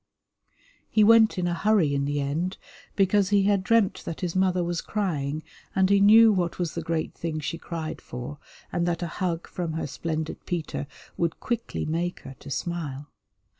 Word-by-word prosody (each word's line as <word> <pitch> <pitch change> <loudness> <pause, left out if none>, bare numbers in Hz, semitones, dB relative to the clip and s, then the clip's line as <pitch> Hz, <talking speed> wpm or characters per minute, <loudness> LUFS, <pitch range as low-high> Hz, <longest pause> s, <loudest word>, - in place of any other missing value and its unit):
He 215 - +4
went 225 0 +6
in 180 - 0
a 175 - 0
hurry 175 -4 +2
in 140 0 0
the 145 +1 -1
end 155 +7 -2 0.4
because 195 0 +3
he 200 -1 +4
had 200 -1 +2
dreamt 225 -1 +2
that 165 - -6
his 180 -2 -2
mother 185 -1 +2
was 175 -1 -2
crying, 155 -7 -2 0.3
and 190 0 +3
he 200 - +6
knew 220 +2 +8
what 175 -3 -1
was 175 -3 -2
the 170 - -3
great 160 0 -2
thing 160 -2 -4
she 160 +2 -4
cried 160 -2 -5
for, 125 +4 -7 0.3
and 175 0 0
that 175 0 -1
a - - -1
hug 170 -2 -1
from 170 -3 -4
her 160 - -2
splendid 160 +2 -4
Peter 165 -4 -3 0.3
would 170 -1 -1
quickly 235 -1 -3
make 170 +3 -2
her 135 - -10
to - - -10
smile. 145 -3 -4
170 Hz, 185 wpm, -26 LUFS, 155-190 Hz, 0.4 s, knew